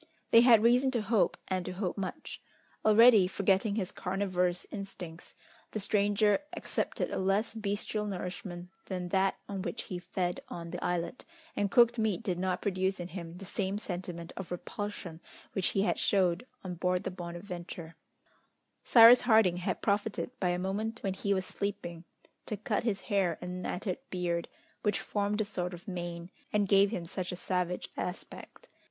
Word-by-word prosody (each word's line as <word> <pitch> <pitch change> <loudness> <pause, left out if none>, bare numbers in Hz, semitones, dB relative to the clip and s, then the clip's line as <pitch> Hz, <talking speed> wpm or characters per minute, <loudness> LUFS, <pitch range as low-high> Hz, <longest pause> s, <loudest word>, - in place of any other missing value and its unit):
They 230 - +9
had 235 -3 +7
reason 250 +3 +5
to 220 - -1
hope, 210 0 +2
and 185 -1 -1
to 185 - -5
hope 185 -1 -2
much. 195 -2 -5 0.4
Already, 215 -2 +7
forgetting 195 +2 +1
his 190 -4 -2
carnivorous 180 -2 -1
instincts, 185 -4 -8 0.4
the 215 - -1
stranger 205 0 +3 0.2
accepted - - -2
a - - -1
less 195 +4 +1
bestial 210 0 -2
nourishment 180 -2 -5 0.2
than 180 -2 -3
that 190 +1 +2
on 195 -2 -4
which 175 -3 -4
he 180 - -5
fed 180 0 -2
on 170 -1 -6
the - - -5
islet, 175 +7 -2 0.3
and 205 -1 +1
cooked 235 +2 +5
meat 215 -5 0
did 180 -3 -1
not 185 0 -1
produce 190 -1 0
in 175 0 -5
him 170 -1 -7
the 195 - -9
same 195 +1 -2
sentiment 175 -4 -6
of 190 -3 -6
repulsion 180 -2 -5 0.3
which 190 - +1
he 195 - +1
had - - +1
showed 190 +3 +2 0.2
on 185 -2 -4
board 180 +2 0
the - - -3
Bonadventure. 175 -1 -7 0.9
Cyrus 235 +1 +9
Harding 220 -7 +4
had 180 - -2
profited 205 +3 0
by 180 - +1
a 175 - +1
moment 210 +5 -3
when 195 -2 0
he 200 +1 -2
was 190 -1 +1
sleeping, 175 -5 -4 0.4
to 215 - -2
cut 210 - -1
his 205 -5 0
hair 195 -6 +1
and 180 0 -5
matted 180 +1 -3
beard, 175 -2 -1 0.3
which 210 -2 +1
formed 205 +1 -1
a - - 0
sort 180 -3 -3
of 175 +5 -15
mane, 175 -1 -5 0.2
and 205 -1 +2
gave 195 +1 +5
him 180 -6 -4
such 180 +1 -4
a - - -3
savage 180 0 -2
aspect. 180 - -6
190 Hz, 170 wpm, -31 LUFS, 180-205 Hz, 0.9 s, They